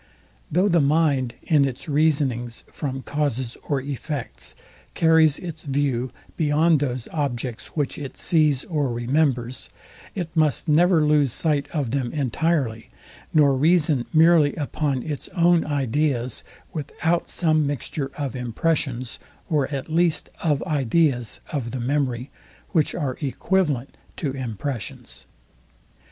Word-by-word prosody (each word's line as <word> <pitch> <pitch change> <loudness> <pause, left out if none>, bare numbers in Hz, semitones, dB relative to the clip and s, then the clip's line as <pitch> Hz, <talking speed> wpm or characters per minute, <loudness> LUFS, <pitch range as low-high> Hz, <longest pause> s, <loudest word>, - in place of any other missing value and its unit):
Though 180 +6 +3
the 170 -4 +4
mind 140 -5 +2
in 150 -4 +4
its 135 +1 -3
reasonings 140 -6 +1
from 135 -3 -4
causes 130 -5 -2
or 140 -2 +2
effects 135 - -5 0.4
carries 160 -2 +5
its 165 -3 -7
view 135 -3 0 0.3
beyond 155 +1 +3
those 125 -4 -2
objects, 125 -5 -3
which 145 -3 -1
it 140 -3 -7
sees 155 -5 +2
or 150 -7 -1
remembers, 125 0 0 0.5
it 175 -4 -4
must 155 -6 +2
never 165 +2 +4
lose 150 -3 +3
sight 145 -3 +1
of 140 -8 -1
them 130 -3 -1
entirely, 140 -4 0 0.4
nor 145 -3 +5
reason 150 -2 +3
merely 160 -2 +5
upon 145 -3 -1
its 150 -3 -5
own 175 -1 +4
ideas, 135 -3 -1 0.3
without 160 +2 -1
some 155 -4 +2
mixture 140 0 -3
of 140 -5 -3
impressions, 125 0 -1 0.3
or 145 -4 +2
at 140 0 -4
least 165 0 +1
of 150 -4 +1
ideas 140 -4 +1
of 130 -6 -2
the 130 - -4
memory, 130 -1 -1 0.4
which 155 -4 +1
are 140 -6 -2
equivalent 145 -2 0 0.2
to 145 -5 -2
impressions. 125 - -5
145 Hz, 125 wpm, -23 LUFS, 130-155 Hz, 0.5 s, carries